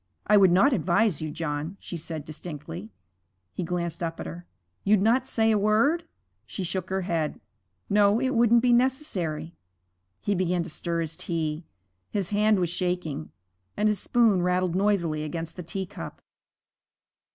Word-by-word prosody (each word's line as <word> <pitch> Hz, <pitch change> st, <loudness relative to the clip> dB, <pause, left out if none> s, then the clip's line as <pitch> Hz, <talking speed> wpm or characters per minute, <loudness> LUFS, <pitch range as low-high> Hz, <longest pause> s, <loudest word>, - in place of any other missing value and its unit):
'I 210 Hz, -, +5 dB
would 190 Hz, -3 st, +6 dB
not 195 Hz, +11 st, +5 dB
advise 185 Hz, -, +2 dB
you, 155 Hz, -, -3 dB
John,' 155 Hz, +2 st, -4 dB
she -, -, -7 dB
said, 160 Hz, -2 st, -6 dB
distinctly. 150 Hz, -, -7 dB, 0.6 s
He -, -, -4 dB
glanced 170 Hz, -1 st, -3 dB
up 165 Hz, -1 st, -3 dB
at -, -, -5 dB
her. 85 Hz, +2 st, -8 dB, 0.4 s
'You'd 210 Hz, 0 st, +4 dB
not 245 Hz, +4 st, +3 dB
say 225 Hz, -1 st, +2 dB
a 215 Hz, -, +3 dB
word?' 230 Hz, +12 st, +3 dB, 0.4 s
She 190 Hz, -, -4 dB
shook 185 Hz, +1 st, -3 dB
her 190 Hz, 0 st, 0 dB
head. 165 Hz, -4 st, -1 dB, 0.5 s
'No, 205 Hz, +1 st, +4 dB
it 260 Hz, +1 st, 0 dB
wouldn't 235 Hz, 0 st, +4 dB
be 245 Hz, -1 st, +5 dB
necessary.' 195 Hz, -, 0 dB, 0.7 s
He 205 Hz, -, 0 dB
began 180 Hz, -2 st, +1 dB
to 170 Hz, -, -7 dB
stir 170 Hz, +1 st, -2 dB
his 165 Hz, 0 st, -3 dB
tea. 160 Hz, -1 st, -3 dB, 0.4 s
His 200 Hz, -3 st, -2 dB
hand 210 Hz, +1 st, +3 dB
was 175 Hz, -2 st, 0 dB
shaking, 175 Hz, -5 st, -2 dB, 0.5 s
and 210 Hz, -, +3 dB
his 210 Hz, -2 st, +1 dB
spoon 220 Hz, -6 st, +3 dB
rattled 180 Hz, 0 st, +1 dB
noisily 180 Hz, -6 st, +1 dB
against 165 Hz, +1 st, -5 dB
the 180 Hz, -, -6 dB
teacup. 190 Hz, +3 st, -6 dB
180 Hz, 160 wpm, -26 LUFS, 165-210 Hz, 0.7 s, would